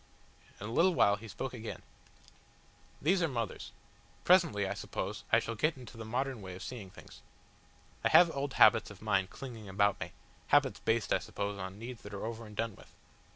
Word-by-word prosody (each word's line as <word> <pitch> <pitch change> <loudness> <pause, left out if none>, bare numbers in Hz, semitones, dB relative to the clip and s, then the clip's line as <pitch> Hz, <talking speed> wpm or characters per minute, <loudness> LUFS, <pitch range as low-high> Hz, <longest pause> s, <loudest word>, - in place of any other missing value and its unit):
In 105 - -6
a - - -5
little 175 +8 +4
while 100 - +5
he 110 +2 -10
spoke 125 +5 -5
again: 115 -2 -7 1.2
"These 180 +5 +3
are 165 - +3
mothers. 115 -7 -4 0.5
Presently, 165 - +4
I - - -1
suppose, 105 +2 -5
I 110 - +7
shall 115 0 -1
get 150 +7 0
into 125 -2 -11
the 115 - -7
modern 130 +1 -2
way 95 -2 -7
of 95 - -8
seeing 110 -7 -7
things. - - -14 0.8
I - - +3
have 175 -1 +7
old 140 0 -2
habits 110 - +6
of 105 -1 -12
mind 100 -3 +1
clinging 115 -6 -8
about 100 0 +2
me - - -5 0.3
habits 135 -8 +3
based, 110 +2 +1
I - - +3
suppose, 100 0 -4
on 95 +1 -6
needs 120 +2 -8
that 105 0 -8
are 100 - -4
over 115 0 -5
and 105 - -12
done 110 -1 -2
with. - - -17
110 Hz, 200 wpm, -32 LUFS, 100-130 Hz, 1.2 s, I